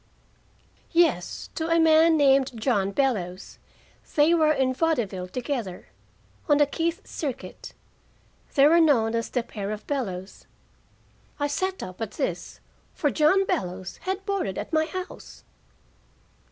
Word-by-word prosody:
"Yes, 320 Hz, -, +1 dB
to 320 Hz, -, -3 dB
a 330 Hz, 0 st, +3 dB
man 320 Hz, 0 st, +5 dB
named 270 Hz, -4 st, +3 dB
John 210 Hz, -5 st, +1 dB
Bellows. 195 Hz, -6 st, -2 dB, 0.6 s
They 305 Hz, +2 st, +5 dB
were 315 Hz, -2 st, +4 dB
in 265 Hz, -3 st, +1 dB
vaudeville 240 Hz, -, -1 dB
together, 240 Hz, -4 st, -4 dB, 0.6 s
on 290 Hz, -, +5 dB
the 290 Hz, -, +5 dB
Keith 335 Hz, +7 st, -2 dB
Circuit. 280 Hz, -7 st, -6 dB, 0.8 s
They 275 Hz, -1 st, +6 dB
were 335 Hz, +3 st, +6 dB
known 235 Hz, -8 st, +3 dB
as 230 Hz, 0 st, -1 dB
The 245 Hz, -, -1 dB
Pair 205 Hz, -4 st, -6 dB
of 215 Hz, 0 st, -5 dB
Bellows." 195 Hz, -10 st, -4 dB, 0.9 s
I 290 Hz, -, +1 dB
sat 375 Hz, +6 st, -2 dB
up 185 Hz, +4 st, -9 dB
at 220 Hz, -2 st, -4 dB
this -, -, -4 dB, 0.4 s
for 290 Hz, -, +1 dB
John 370 Hz, +6 st, +3 dB
Bellows 185 Hz, -, -3 dB
had 385 Hz, +1 st, -4 dB
boarded 395 Hz, -, -2 dB
at -, -, -6 dB
my 315 Hz, 0 st, +3 dB
house. 370 Hz, +2 st, -8 dB
280 Hz, 135 wpm, -25 LUFS, 215-325 Hz, 0.9 s, They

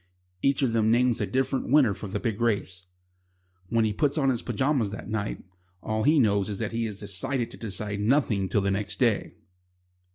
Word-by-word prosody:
Each 140 Hz, 0 st, +2 dB
of 120 Hz, -4 st, +1 dB
them 110 Hz, -1 st, +2 dB
names 120 Hz, 0 st, +3 dB
a -, -, 0 dB
different 130 Hz, 0 st, -1 dB
winner 135 Hz, -6 st, +5 dB
for 105 Hz, -, -7 dB
the 95 Hz, -, -3 dB
big 115 Hz, -2 st, -3 dB
race. 95 Hz, -5 st, -1 dB, 0.8 s
When 115 Hz, -1 st, +2 dB
he 105 Hz, -, 0 dB
puts 145 Hz, +5 st, 0 dB
on 135 Hz, -3 st, +3 dB
his 120 Hz, -, -2 dB
pyjamas 125 Hz, -1 st, 0 dB
that 105 Hz, +2 st, -7 dB
night, 110 Hz, -1 st, -3 dB, 0.4 s
all 110 Hz, 0 st, -1 dB
he 150 Hz, +7 st, +4 dB
knows 100 Hz, -6 st, +2 dB
is 100 Hz, -, -3 dB
that 110 Hz, -1 st, -3 dB
he 115 Hz, 0 st, -1 dB
has 105 Hz, -3 st, -6 dB
decided 115 Hz, +6 st, -2 dB
to -, -, -10 dB
decide 105 Hz, -1 st, -3 dB
nothing 105 Hz, -4 st, +1 dB
till 100 Hz, -, +2 dB
the 100 Hz, 0 st, 0 dB
next 100 Hz, +1 st, -2 dB
day. -, -, +1 dB
110 Hz, 200 wpm, -26 LUFS, 100-130 Hz, 0.8 s, winner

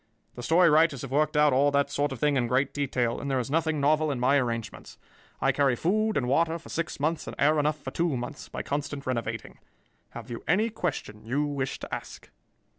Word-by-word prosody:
"The 120 Hz, -, -8 dB
story 170 Hz, +7 st, +4 dB
writers 155 Hz, -4 st, +3 dB
have 135 Hz, -, -7 dB
worked 150 Hz, +2 st, +1 dB
out 150 Hz, -2 st, +5 dB
all 140 Hz, +3 st, +4 dB
that 140 Hz, 0 st, +1 dB
sort 145 Hz, +1 st, 0 dB
of 135 Hz, -, -4 dB
thing 145 Hz, +4 st, +1 dB
in 125 Hz, -3 st, +1 dB
great 130 Hz, +3 st, +1 dB
detail, 125 Hz, -4 st, -1 dB
and 140 Hz, -, -4 dB
there 135 Hz, -, +1 dB
is 125 Hz, +1 st, -2 dB
nothing 160 Hz, -1 st, +1 dB
novel 155 Hz, +2 st, +2 dB
in 135 Hz, -4 st, -2 dB
my 130 Hz, +3 st, +3 dB
arrangements. 115 Hz, -4 st, -3 dB, 0.4 s
I -, -, +3 dB
carry 140 Hz, -3 st, +2 dB
food 215 Hz, -, +1 dB
and 125 Hz, -, 0 dB
water 165 Hz, +5 st, +2 dB
for 165 Hz, -, -14 dB
six 165 Hz, -3 st, -3 dB
months 155 Hz, +3 st, -1 dB
and -, -, -6 dB
air 150 Hz, +1 st, +3 dB
enough 150 Hz, +1 st, 0 dB
for 130 Hz, -, -7 dB
two 165 Hz, -4 st, 0 dB
months 120 Hz, 0 st, -7 dB
by -, -, -5 dB
constant 145 Hz, 0 st, -4 dB
renovating. 115 Hz, -3 st, -4 dB, 0.6 s
Have -, -, -8 dB
you 115 Hz, -, -6 dB
any 215 Hz, +7 st, +2 dB
question 155 Hz, -, -4 dB
you 135 Hz, +7 st, 0 dB
wish 140 Hz, -2 st, -3 dB
to -, -, -9 dB
ask?" -, -, -7 dB
145 Hz, 220 wpm, -27 LUFS, 130-155 Hz, 0.6 s, out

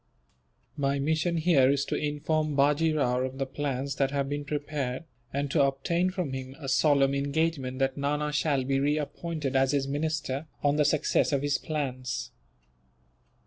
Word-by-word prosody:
"My 140 Hz, -1 st, +1 dB
mission 160 Hz, +4 st, 0 dB
here 155 Hz, -6 st, +4 dB
is 140 Hz, 0 st, +2 dB
to -, -, -2 dB
inform 150 Hz, 0 st, -1 dB
Bajee 145 Hz, +3 st, +3 dB
Rao 125 Hz, -5 st, +1 dB
of 130 Hz, +1 st, -3 dB
the 135 Hz, -, -1 dB
plans 135 Hz, 0 st, -3 dB
that 135 Hz, -1 st, +2 dB
have 140 Hz, -1 st, -1 dB
been 145 Hz, +1 st, -3 dB
prepared, 145 Hz, -3 st, -3 dB, 0.3 s
and 140 Hz, 0 st, -2 dB
to 150 Hz, -, +3 dB
obtain 140 Hz, +7 st, +1 dB
from 180 Hz, -7 st, -3 dB
him 130 Hz, 0 st, -6 dB
a 140 Hz, -, -7 dB
solemn 140 Hz, 0 st, +3 dB
engagement 140 Hz, -1 st, -1 dB
that 135 Hz, 0 st, 0 dB
Nana 150 Hz, +1 st, 0 dB
shall 145 Hz, -2 st, +1 dB
be 135 Hz, +1 st, +1 dB
reappointed 150 Hz, 0 st, -2 dB
as 135 Hz, +1 st, +3 dB
his 140 Hz, -1 st, +1 dB
minister, 145 Hz, 0 st, -2 dB, 0.2 s
on 145 Hz, 0 st, +3 dB
the 150 Hz, -, +3 dB
success 150 Hz, +2 st, +2 dB
of 140 Hz, -1 st, +1 dB
his 145 Hz, -1 st, +1 dB
plans." 130 Hz, -5 st, -3 dB
140 Hz, 165 wpm, -28 LUFS, 135-150 Hz, 0.3 s, here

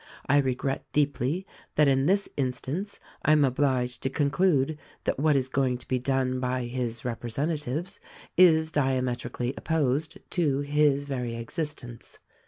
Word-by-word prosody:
I 145 Hz, -, +4 dB
regret 135 Hz, 0 st, -1 dB
deeply 145 Hz, +4 st, 0 dB, 0.3 s
that 150 Hz, -1 st, +5 dB
in 135 Hz, +1 st, +3 dB
this 200 Hz, +2 st, +3 dB
instance 140 Hz, +9 st, -3 dB, 0.2 s
I 155 Hz, -, +5 dB
am 150 Hz, -2 st, +5 dB
obliged 130 Hz, -2 st, 0 dB
to 135 Hz, -, 0 dB
conclude 150 Hz, +1 st, +1 dB, 0.2 s
that -, -, -1 dB
what 150 Hz, 0 st, +3 dB
is 130 Hz, -1 st, +1 dB
going 130 Hz, -1 st, +1 dB
to 125 Hz, -, -13 dB
be 130 Hz, -, 0 dB
done 130 Hz, 0 st, 0 dB
by 125 Hz, 0 st, -1 dB
his 120 Hz, -1 st, -3 dB
representatives 145 Hz, +7 st, -3 dB, 0.4 s
is 160 Hz, -3 st, +5 dB
diametrically 125 Hz, -3 st, -1 dB
op -, -, -10 dB
posed 155 Hz, -1 st, 0 dB
to 145 Hz, -6 st, +1 dB
his 145 Hz, -1 st, +2 dB
very 125 Hz, -4 st, -3 dB
existence. 120 Hz, 0 st, -5 dB
135 Hz, 145 wpm, -27 LUFS, 125-150 Hz, 0.4 s, that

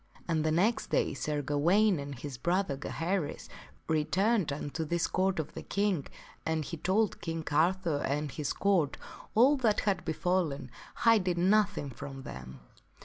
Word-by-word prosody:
And 160 Hz, -3 st, +1 dB
the 155 Hz, -, +1 dB
next 200 Hz, +9 st, +2 dB
day -, -, +1 dB
Sir 145 Hz, +1 st, -2 dB
Gawaine 170 Hz, +7 st, +3 dB
and 140 Hz, -1 st, -6 dB
his 140 Hz, +1 st, -6 dB
brother, 175 Hz, -1 st, 0 dB
Gaheris, 165 Hz, +3 st, -3 dB, 0.4 s
returned 180 Hz, +4 st, +1 dB
unto 145 Hz, +3 st, -3 dB
this 170 Hz, +2 st, 0 dB
Court 190 Hz, +1 st, 0 dB
of 160 Hz, -, -3 dB
the -, -, -6 dB
King 200 Hz, -7 st, 0 dB, 0.4 s
and 160 Hz, -2 st, -1 dB
he 170 Hz, -, -5 dB
told 195 Hz, +6 st, +1 dB
King 165 Hz, -2 st, -4 dB
Arthur 170 Hz, +1 st, +2 dB
and 145 Hz, +1 st, -1 dB
his 150 Hz, 0 st, -3 dB
Court 185 Hz, -8 st, +1 dB, 0.4 s
all 265 Hz, +6 st, +6 dB
that 225 Hz, -5 st, +2 dB
had 200 Hz, -2 st, 0 dB
befallen, 160 Hz, -5 st, -1 dB, 0.2 s
hiding 185 Hz, -5 st, +3 dB
nothing 205 Hz, -9 st, +2 dB
from 135 Hz, +1 st, -8 dB
them. 65 Hz, -, -9 dB
165 Hz, 150 wpm, -30 LUFS, 145-195 Hz, 0.4 s, all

